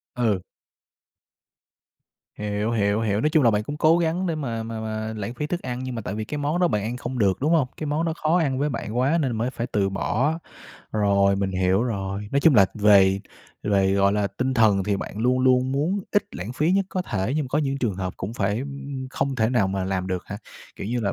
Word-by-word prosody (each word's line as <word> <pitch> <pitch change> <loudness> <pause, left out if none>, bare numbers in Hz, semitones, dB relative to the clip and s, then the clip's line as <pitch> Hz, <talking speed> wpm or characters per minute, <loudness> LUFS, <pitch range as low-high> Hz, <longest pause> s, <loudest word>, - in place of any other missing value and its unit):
Ừ. 110 -6 +1 2.0
Hiểu, 105 +1 -2
hiểu, 105 -2 +1
hiểu, 105 -2 0
nói 150 - +2
chung 155 -1 +4
là 120 - +5
bạn 105 -1 +1
cũng 145 +7 -5
cố 160 +3 +4
gắng 170 +2 0
để 170 - 0
mà 120 -7 -3
mà 110 0 -5
mà 110 0 -4
lãng 105 +3 -4
phí 150 - -3
thức 175 +3 -3
ăn 125 -1 -4
nhưng 130 -1 -4
mà 115 - -3
tại 100 - -4
vì 110 0 -3
cái 150 +7 -5
món 150 +4 -1
đó 175 - +4
bạn 105 -9 0
ăn 115 +4 -3
không 125 0 -5
được, 100 -4 +2
đúng 150 +5 +1
hông? 155 -6 +3
Cái 155 - -4
món 150 +3 0
đó 165 - 0
khó 160 +3 +2
ăn 140 -6 0
với 145 +2 +1
bạn 115 -4 -4
quá 140 +7 +2
nên 140 -5 0
là - - -2
mới 115 +3 -1
phải 120 -2 -4
từ 100 -5 0
bỏ. 120 - 0 0.5
Rồi, 100 -2 +3
mình 100 -1 -1
hiểu 95 +3 +2
rồi, 100 -3 -3
nói 140 - +3
chung 160 -1 +5
là 100 -4 +7
về 100 -2 +5 0.4
về, 95 -2 +2
gọi 100 0 +3
là, 105 0 +1
tinh 130 +7 -2
thần 105 -5 +4
thì 100 0 0
bạn 100 - -6
luôn 125 +3 +2
luôn 130 0 +3
muốn 160 +9 0
ít 205 - +3
lãng 95 +7 -5
phí 155 +7 +1
nhất 195 0 +2
có 185 - -2
thể 105 - -2
nhưng 155 - 0
mà - - -8
có 145 - +1
những 140 -2 -1
trường 120 -7 -1
hợp 90 -1 -4
cũng 100 +5 -5
phải 105 +1 0 0.5
không 135 0 -1
thể 110 -2 +2
nào 115 -7 +2
mà 95 -1 -2
làm 95 -1 -2
được 90 -2 -2
hả? 100 - -6 0.4
Kiểu - - -6
như 120 +3 -1
là 100 -3 0
115 Hz, 250 wpm, -24 LUFS, 100-140 Hz, 2.0 s, là